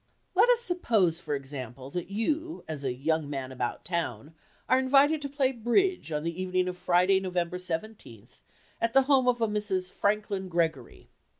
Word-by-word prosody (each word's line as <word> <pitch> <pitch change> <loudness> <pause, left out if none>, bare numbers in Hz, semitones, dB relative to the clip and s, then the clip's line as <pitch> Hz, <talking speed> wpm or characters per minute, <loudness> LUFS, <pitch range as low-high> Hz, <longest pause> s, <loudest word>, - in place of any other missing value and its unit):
Let 430 +6 +5
us 485 -1 +4
suppose, 225 - +1
for 150 -3 -3
example, 135 -1 -7
that 175 +2 -4
you, 310 +11 -2
as 150 -3 -5
a 130 - 0
"young 150 +4 -1
man 135 -2 -4
about 125 -2 -4
town," 160 - -3 0.3
are 255 - +4
invited 280 +4 +4
to 280 - -4
play 275 -2 +1
"bridge" 255 - +1
on 150 0 -2
the 170 +2 -3
evening 185 0 0
of 180 - -3
Friday, 180 +2 +3
November 180 -1 -2
seventeenth, 165 - -7 0.4
at 230 0 +1
the 270 - +6
home 265 -2 +3
of 245 -1 +3
Mrs. 210 -5 -1
Franklin 205 -2 -1
Gregory. 170 -2 -2
185 Hz, 170 wpm, -28 LUFS, 160-250 Hz, 0.4 s, the